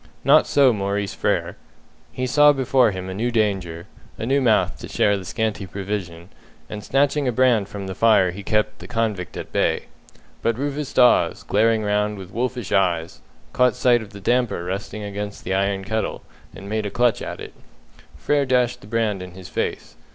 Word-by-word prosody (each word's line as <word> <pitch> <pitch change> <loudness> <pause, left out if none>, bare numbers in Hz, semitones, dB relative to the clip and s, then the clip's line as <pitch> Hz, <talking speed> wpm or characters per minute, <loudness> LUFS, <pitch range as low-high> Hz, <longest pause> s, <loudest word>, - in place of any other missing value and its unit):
Not - - +5
so 135 -3 +4
Maurice 100 -1 -2
Frere. - - -1 0.5
He 130 - -3
saw 145 +3 +5
before 130 -3 +3
him 95 -2 -5
a 95 - -5
new 115 +5 -1
danger, 95 -7 -1 0.3
a - - -4
new 135 +3 +2
mouth 115 -4 +2
to - - -8
share 100 - +2
the 95 - -5
scanty 110 0 -3
provision, 95 -4 -5 0.4
and 105 -1 -7
snatching 140 +2 +1
a - - +2
brand 120 -5 +2
from 100 -1 -6
the 95 - -5
fire 100 -4 +4
he 100 +3 -8
kept 105 +1 -1
the - - -10
convict 110 -6 -2
at - - -7
bay. - - +1 0.6
But 115 +4 0
Rufus 145 +1 -3
Dawes, 125 -1 +3
glaring 110 +1 +2
round 105 0 0
with 95 -1 -10
wolfish 120 0 -3
eyes, 85 -4 0 0.3
caught 125 -3 +3
sight 120 -2 +3
of 110 - -10
the 100 -1 -11
damper 120 -3 0
resting 100 +3 -5
against 100 0 -6
the 95 - -2
iron 95 0 0
kettle, 110 +1 -3 0.3
and 100 - -10
made 110 0 -2
a - - -3
clutch 120 +3 +1
at - - -6
it. - - -9 0.6
Frere 145 -2 +1
dashed 125 -1 +1
the - - -13
brand 110 -3 -1
in 90 -1 -9
his 95 -1 -11
face. - - -4
105 Hz, 190 wpm, -22 LUFS, 100-125 Hz, 0.6 s, Not